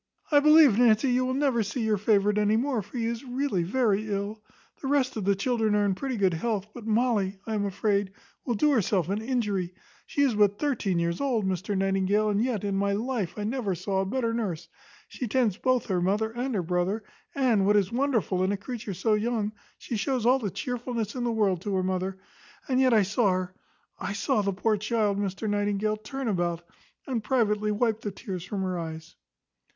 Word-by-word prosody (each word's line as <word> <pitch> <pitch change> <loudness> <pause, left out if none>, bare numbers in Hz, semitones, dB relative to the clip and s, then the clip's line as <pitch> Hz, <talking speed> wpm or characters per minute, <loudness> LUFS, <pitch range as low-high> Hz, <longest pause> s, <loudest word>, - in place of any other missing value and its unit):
I 290 - +7
believe, 300 -6 +6
Nancy, 240 +2 +4
you 255 +1 +2
will 255 - -1
never 270 -4 +2
see 225 +3 -2
your 215 -2 +1
favourite 210 0 +2
any 210 +1 +3
more; 250 -1 0
for 225 - -9
he 230 - -1
is 230 +1 -3
really 255 -6 -1
very 215 +2 +1
ill. 200 +2 -3 0.4
The 270 - -4
rest 265 -2 +1
of 215 -4 -3
the 200 0 +3
children 220 0 +1
are 205 0 +2
in 200 - +2
pretty 260 +5 -3
good 190 -3 +2
health: 205 +3 -1
but 235 -3 -9
Molly, 215 -4 +1
I 225 - -3
am 205 -1 0
afraid, 200 0 0 0.3
will 240 - -1
do 300 +8 +3
herself 195 - +1
an 205 +2 -1
injury: 205 -7 -1 0.3
she 285 - +1
is 270 -4 +3
but 205 -1 +3
thirteen 230 - 0
years 170 0 -1
old, 245 -7 0
Mr 190 +2 -1
Nightingale, 195 +2 +1
and 205 +1 +1
yet, 240 -6 -1
in 200 -1 -1
my 200 0 +1
life, 220 -3 -2
I 210 - -3
never 215 -4 -1
saw 190 +2 -1
a - - -1
better 230 +1 -1
nurse: 190 -8 -3 0.4
she 250 - -5
tends 225 -4 +1
both 255 -2 +1
her 185 -3 0
mother 210 +5 +1
and 245 +1 -3
her 185 - 0
brother; 180 +5 -1 0.3
and, 235 -8 +2
what 210 0 +5
is 200 0 +1
wonderful 235 -7 0
in 190 - +1
a 205 - -1
creature 220 -2 -6
so 215 +5 +1
young, 215 0 0 0.3
she 235 - -4
shows 255 +1 -1
all 255 +2 +5
the 210 -5 -2
chearfulness 230 +2 -3
in 250 - -3
the 240 - 0
world 200 -6 +1
to 200 0 -2
her 185 - +1
mother; 185 +1 -2 0.5
and 255 -1 +1
yet 260 -1 +4
I 220 -3 +5
saw 205 +3 +1
her 185 0 -3 0.5
I 200 - -3
saw 205 +1 +1
the 200 -1 0
poor 210 +3 0
child, 210 -1 0
Mr 200 +2 -3
Nightingale, 205 +1 0
turn 260 +5 -5
about, 175 -4 -1 0.4
and 245 -5 -2
privately 215 -3 +1
wipe 220 +1 0
the 210 - -3
tears 190 -3 -6
from 190 +1 -3
her 185 -2 -2
eyes." 160 0 -7
210 Hz, 215 wpm, -27 LUFS, 195-240 Hz, 0.5 s, I